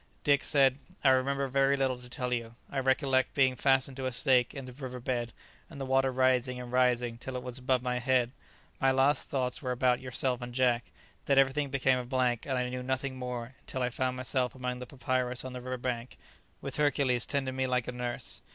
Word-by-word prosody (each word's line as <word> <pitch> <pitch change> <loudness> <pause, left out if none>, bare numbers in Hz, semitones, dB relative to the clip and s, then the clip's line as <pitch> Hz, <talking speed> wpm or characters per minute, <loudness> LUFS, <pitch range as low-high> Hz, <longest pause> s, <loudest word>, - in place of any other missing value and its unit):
Dick 140 -2 +3
said, 135 -2 +3 0.2
"I 135 - +6
remember 135 +1 +2
very 135 +1 +2
little 130 -2 0
to 125 0 -12
tell 125 0 -2
you. 115 -1 -3 0.2
I 135 - -1
recollect 130 0 +2
being 130 -2 +4
fastened 135 +1 +3
to 130 -1 -2
a - - -2
stake 125 0 +3
in 135 -2 -6
the 125 - -9
river 125 -1 -7
bed 120 -1 -2 0.4
and 150 -4 -10
the 135 - -3
water 135 0 +2
rising 130 -1 +2
and 125 -1 -7
rising 125 -2 +2
till 130 +1 -6
it 125 - -4
was 125 0 -5
above 125 -1 +1
my 125 -1 -1
head. 125 -1 +2 0.5
My 135 - +3
last 135 +2 +2
thoughts 130 -3 -1
were 130 - -3
about 125 0 +2
yourself 130 0 -2
and 120 0 -7
Jack. 125 -2 +1 0.3
Then 140 - +2
everything 135 +1 +3
became 130 -1 +2
a - - -3
blank, 125 -1 0
and 130 -2 0
I 125 0 0
knew 125 0 -4
nothing 130 +1 -2
more 125 -1 -5
until 130 - -4
I 125 - +1
found 130 +1 -2
myself 130 -1 -1
amongst 125 -1 -3
the 125 - -7
papyrus 125 -1 -1
on 130 - -6
the 125 - -6
river 130 +1 -4
bank, 125 -1 -4 0.4
with - - -4
Hercules 140 -5 +2
tending 135 -2 -1
me 130 0 0
like 125 -2 0
a - - -2
nurse." 125 -1 -5
130 Hz, 220 wpm, -30 LUFS, 125-135 Hz, 0.5 s, I